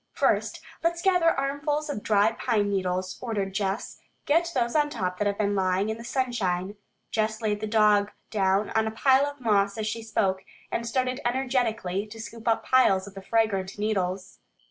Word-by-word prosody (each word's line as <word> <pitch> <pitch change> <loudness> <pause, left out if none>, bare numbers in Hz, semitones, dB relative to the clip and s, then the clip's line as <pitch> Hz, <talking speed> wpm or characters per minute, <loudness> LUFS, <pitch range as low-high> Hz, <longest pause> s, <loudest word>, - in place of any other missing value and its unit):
"First, - - +1 0.2
let's 335 0 +1
gather 360 -3 +4
armfuls 290 +1 -1
of 285 -8 -4
dry 210 +1 +3
pine 220 -3 0
needles," 185 -1 -2
ordered 205 -5 -2
Jess. 195 +2 -2 0.3
"Get 335 +3 +2
those 240 0 0
on 295 -1 +3
top 180 -8 -3
that 210 - +1
have 200 0 -1
been 205 -1 +1
lying 190 +1 +1
in 220 +1 -3
the - - -8
sunshine." 215 -7 -1 0.4
Jess 215 0 0
laid 210 -2 -1
the 215 - -2
dog 210 -2 +4 0.2
down 195 0 +1
on 220 0 +1
a - - +1
bed 260 +4 +4
of 285 0 -6
moss 200 -3 +2
as 220 - -2
she 220 +2 -3
spoke, 200 -4 0 0.3
and 235 - -2
started 255 +1 -1
energetically 240 -6 -1
to 225 +2 -11
scoop 230 +1 -9
up 225 - +2
piles 220 -7 +4
of 200 - -11
the 195 - -8
fragrant 195 -3 0
needles. 195 -3 -2
220 Hz, 185 wpm, -26 LUFS, 200-250 Hz, 0.4 s, gather